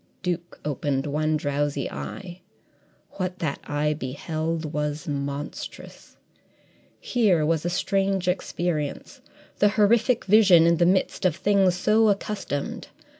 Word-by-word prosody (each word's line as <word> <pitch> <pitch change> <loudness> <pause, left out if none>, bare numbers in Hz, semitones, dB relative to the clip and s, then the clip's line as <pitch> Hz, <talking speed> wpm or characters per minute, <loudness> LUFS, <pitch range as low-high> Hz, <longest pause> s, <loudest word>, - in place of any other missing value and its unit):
Duke 175 -1 -4
opened 140 -1 -1
one 155 +1 0
drowsy 145 -1 -1
eye. 185 -2 -7 0.8
What 185 -1 -3
that 155 -6 -3
eye 150 +1 0
beheld 155 +3 -4
was 150 0 -3
monstrous. 140 0 -6 0.8
Here 200 -11 +2
was 160 0 0
a - - +1
strange 195 +1 0
experience 170 -4 -2 0.4
the 205 - +5
horrific 230 +4 +2
vision 195 -5 +6
in 170 0 +4
the 170 +1 +3
midst 190 +2 +1
of 180 -4 +2
things 190 -1 +2
so 215 +4 +3
accustomed. 195 -7 -3
170 Hz, 120 wpm, -25 LUFS, 150-195 Hz, 0.8 s, vision